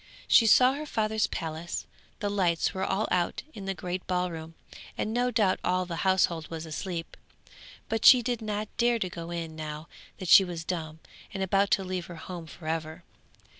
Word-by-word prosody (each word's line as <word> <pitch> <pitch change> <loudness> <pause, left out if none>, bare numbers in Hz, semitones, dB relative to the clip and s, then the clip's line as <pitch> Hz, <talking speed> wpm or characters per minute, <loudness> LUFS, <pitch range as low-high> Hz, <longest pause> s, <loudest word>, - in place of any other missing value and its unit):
She 230 - +6
saw 250 +4 +6
her 300 +2 -5
father's 220 -3 0
palace; 160 +1 -4 0.4
the 205 - 0
lights 180 -4 +1
were 190 -1 -2
all 205 +3 0
out 175 -1 0
in 200 - -8
the 195 0 -2
great 180 +1 -5
ballroom, 170 -3 -2 0.4
and 215 - -2
no 245 +1 +1
doubt 215 -6 +2
all 185 0 +1
the 170 -2 -5
household 180 -4 +1
was 165 -1 -6
asleep, 165 +1 -5 0.7
but 225 0 -2
she 250 -2 +9
did 240 -1 -2
not 215 0 -3
dare 240 0 +3
to 185 -5 -2
go 170 -1 -7
in 165 -2 -5
now 155 0 -6 0.3
that 185 - -6
she 195 - +9
was 175 -3 -5
dumb 160 -3 -4 0.3
and 195 - -1
about 195 +1 +2
to 195 - -6
leave 185 -1 -4
her 175 - -9
home 170 0 -8
for 155 0 -11
ever. 160 +1 -3
180 Hz, 190 wpm, -28 LUFS, 165-205 Hz, 0.7 s, she